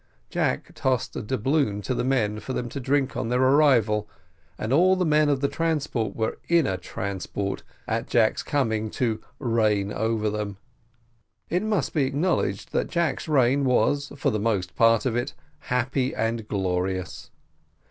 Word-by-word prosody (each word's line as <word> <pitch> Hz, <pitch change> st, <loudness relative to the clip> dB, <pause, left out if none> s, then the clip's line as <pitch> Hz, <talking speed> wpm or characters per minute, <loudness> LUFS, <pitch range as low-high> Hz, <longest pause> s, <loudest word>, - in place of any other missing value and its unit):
Jack -, -, +1 dB
also -, -, -19 dB
tossed 130 Hz, -3 st, -1 dB
a -, -, -3 dB
doubloon 130 Hz, -1 st, 0 dB
to 125 Hz, -, -1 dB
the -, -, -1 dB
men 110 Hz, -5 st, +1 dB
for 130 Hz, -, -5 dB
them 120 Hz, -, -2 dB
to 140 Hz, -, -5 dB
drink 135 Hz, 0 st, 0 dB
on 115 Hz, -, -2 dB
their 125 Hz, +1 st, +1 dB
arrival, 130 Hz, -6 st, +4 dB, 0.5 s
and 110 Hz, +4 st, -2 dB
all 185 Hz, +5 st, +5 dB
the 185 Hz, -1 st, 0 dB
men 150 Hz, -1 st, +3 dB
of 140 Hz, -2 st, +1 dB
the 140 Hz, -, +3 dB
transport 150 Hz, -8 st, -1 dB
were 110 Hz, -1 st, -2 dB
in 170 Hz, -3 st, +4 dB
a 95 Hz, -, 0 dB
transport, 95 Hz, +1 st, -4 dB, 0.3 s
at 115 Hz, +2 st, -1 dB
Jack's 115 Hz, -2 st, +2 dB
coming 110 Hz, -6 st, 0 dB
to 115 Hz, -1 st, -1 dB, 0.2 s
"reign 110 Hz, -5 st, +1 dB
over 110 Hz, -1 st, 0 dB
them." 105 Hz, -1 st, -3 dB, 0.9 s
It 180 Hz, +2 st, +2 dB
must 215 Hz, -2 st, -1 dB
be 145 Hz, -4 st, +2 dB
acknowledged 155 Hz, +7 st, -1 dB
that -, -, 0 dB
Jack's 170 Hz, -3 st, -1 dB
reign 140 Hz, -2 st, +3 dB
was, 140 Hz, +2 st, +2 dB
for 140 Hz, -, +1 dB
the 110 Hz, -, -1 dB
most 100 Hz, -4 st, -1 dB
part 115 Hz, 0 st, +4 dB
of 120 Hz, -3 st, 0 dB
it, 120 Hz, +4 st, -2 dB, 0.2 s
"happy 130 Hz, -1 st, -1 dB
and 115 Hz, 0 st, -1 dB
glorious." 95 Hz, -1 st, -2 dB
120 Hz, 170 wpm, -25 LUFS, 105-140 Hz, 0.9 s, all